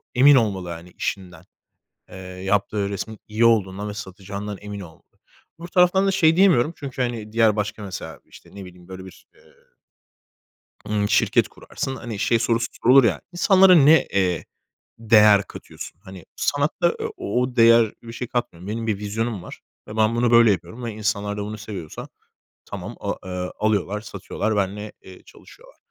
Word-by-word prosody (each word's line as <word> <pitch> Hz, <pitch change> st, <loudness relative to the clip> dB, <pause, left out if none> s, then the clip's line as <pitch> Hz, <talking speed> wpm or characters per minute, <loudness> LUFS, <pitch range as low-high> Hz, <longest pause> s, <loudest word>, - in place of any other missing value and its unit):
emin 140 Hz, +3 st, +7 dB
olmalı, 100 Hz, -7 st, 0 dB
hani, 85 Hz, +1 st, -8 dB
işinden. 95 Hz, -2 st, -5 dB, 0.7 s
Eee, -, -, -12 dB
yaptığı 95 Hz, +2 st, -2 dB
resmin 105 Hz, +1 st, -6 dB
iyi 110 Hz, +2 st, +1 dB
olduğundan 105 Hz, -3 st, +1 dB
ve -, -, -5 dB
satacağından 100 Hz, +1 st, -7 dB
emin 105 Hz, 0 st, -7 dB
olmalı. 85 Hz, -4 st, -12 dB, 0.6 s
Öbür 170 Hz, -, -8 dB
taraftan 180 Hz, +2 st, +3 dB
da -, -, +3 dB
şey 165 Hz, -4 st, +3 dB
diyemiyorum 170 Hz, -6 st, +4 dB
Çünkü, 135 Hz, -2 st, -6 dB
hani, 115 Hz, -4 st, -3 dB
diğer 110 Hz, -2 st, +3 dB
başka, 105 Hz, 0 st, -3 dB
mesela, 95 Hz, -3 st, -7 dB
işte, -, -, -17 dB
ne 100 Hz, -2 st, -8 dB
bileyim, 90 Hz, -1 st, -15 dB
böyle 95 Hz, 0 st, -9 dB
bir, 95 Hz, -, -15 dB
eee -, -, -23 dB, 1.5 s
ımm 105 Hz, -1 st, -1 dB
şirket -, -, +3 dB
kurarsın, 135 Hz, -, -6 dB
hani 115 Hz, -5 st, -7 dB
şey 115 Hz, +1 st, +2 dB
sorusu 115 Hz, 0 st, 0 dB, 0.2 s
sorulur 130 Hz, +3 st, +7 dB
ya: 95 Hz, -10 st, +1 dB
İnsanlara 185 Hz, +1 st, +6 dB
ne, 155 Hz, 0 st, +6 dB
eee, 90 Hz, -4 st, 0 dB, 0.5 s
değer 105 Hz, -2 st, +5 dB
katıyorsun? 85 Hz, -, -11 dB
Hani, 95 Hz, -4 st, -12 dB
sanatta, 150 Hz, +4 st, 0 dB
eee, -, -, -2 dB
o 125 Hz, +4 st, -2 dB
değer 115 Hz, -1 st, +5 dB
bir 115 Hz, -1 st, -10 dB
şey 120 Hz, +1 st, -6 dB
katmıyorum. 100 Hz, -8 st, -4 dB
Benim 115 Hz, +2 st, -4 dB
bir 105 Hz, -3 st, -1 dB
vizyonum 105 Hz, 0 st, -3 dB
var -, -, -11 dB, 0.3 s
ve 105 Hz, -, -8 dB
ben 110 Hz, +1 st, +2 dB
bunu 120 Hz, 0 st, +2 dB
böyle 115 Hz, -1 st, +6 dB
yapıyorum 110 Hz, +5 st, -3 dB
ve 115 Hz, -, -4 dB
insanlar 105 Hz, -1 st, -2 dB
da 105 Hz, -, -3 dB
bunu 105 Hz, +1 st, -6 dB
seviyorsa 100 Hz, -7 st, -8 dB, 0.6 s
tamam, -, -, -7 dB
aaa, -, -, -3 dB
eee, 90 Hz, -1 st, -4 dB
alıyorlar, 105 Hz, -1 st, 0 dB
satıyorlar, 105 Hz, +1 st, -4 dB
benimle, 105 Hz, +1 st, -2 dB
eee, 95 Hz, -1 st, -14 dB
çalışıyorlar. -, -, -18 dB
105 Hz, 165 wpm, -22 LUFS, 100-120 Hz, 1.5 s, emin